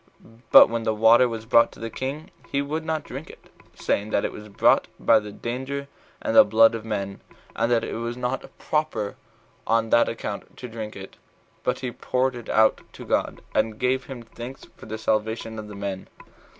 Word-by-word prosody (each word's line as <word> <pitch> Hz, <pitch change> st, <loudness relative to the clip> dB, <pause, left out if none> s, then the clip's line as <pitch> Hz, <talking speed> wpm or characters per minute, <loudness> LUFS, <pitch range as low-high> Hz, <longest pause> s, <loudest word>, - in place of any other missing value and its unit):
But -, -, +10 dB
when 115 Hz, 0 st, -2 dB
the 110 Hz, -1 st, 0 dB
water 115 Hz, +3 st, +6 dB
was 115 Hz, -1 st, -6 dB
brought 115 Hz, 0 st, +5 dB
to -, -, -15 dB
the 115 Hz, 0 st, -5 dB
king, 135 Hz, +6 st, -5 dB, 0.2 s
he 140 Hz, -, 0 dB
would 150 Hz, +3 st, -2 dB
not 160 Hz, -1 st, -2 dB
drink 135 Hz, +5 st, -8 dB
it, -, -, -16 dB, 0.2 s
saying, 105 Hz, +2 st, -1 dB
that 100 Hz, -, +1 dB
it -, -, -2 dB
was 105 Hz, -, -10 dB
brought 100 Hz, -, +3 dB
by 115 Hz, -, +5 dB
the 105 Hz, -1 st, -8 dB
danger 130 Hz, +6 st, -4 dB, 0.4 s
and -, -, -1 dB
the -, -, +10 dB
blood 115 Hz, +2 st, +5 dB
of 115 Hz, -1 st, -5 dB
men, 100 Hz, -3 st, -4 dB, 0.3 s
and 115 Hz, +1 st, 0 dB
that 115 Hz, -1 st, +3 dB
it -, -, -4 dB
was 115 Hz, +1 st, -4 dB
not 125 Hz, +1 st, -3 dB
proper 150 Hz, -10 st, -1 dB, 0.5 s
on 115 Hz, 0 st, +2 dB
that 120 Hz, -, +5 dB
account 105 Hz, -3 st, -6 dB
to 125 Hz, -, -7 dB
drink 110 Hz, -2 st, -7 dB
it. 95 Hz, 0 st, -10 dB, 0.5 s
But -, -, -1 dB
he 125 Hz, -2 st, -3 dB
poured 130 Hz, +1 st, -1 dB
it 120 Hz, -2 st, -9 dB
out 110 Hz, 0 st, +4 dB
to -, -, -10 dB
God, -, -, -1 dB
and 110 Hz, -1 st, +1 dB
gave 130 Hz, +2 st, 0 dB
him 130 Hz, -3 st, -8 dB
thanks 120 Hz, +3 st, -9 dB
for -, -, -13 dB
the 110 Hz, 0 st, -4 dB
salvation 110 Hz, +1 st, -1 dB
of 105 Hz, -, -7 dB
the 105 Hz, -, -9 dB
men. 100 Hz, -1 st, -5 dB
115 Hz, 205 wpm, -24 LUFS, 110-125 Hz, 0.5 s, But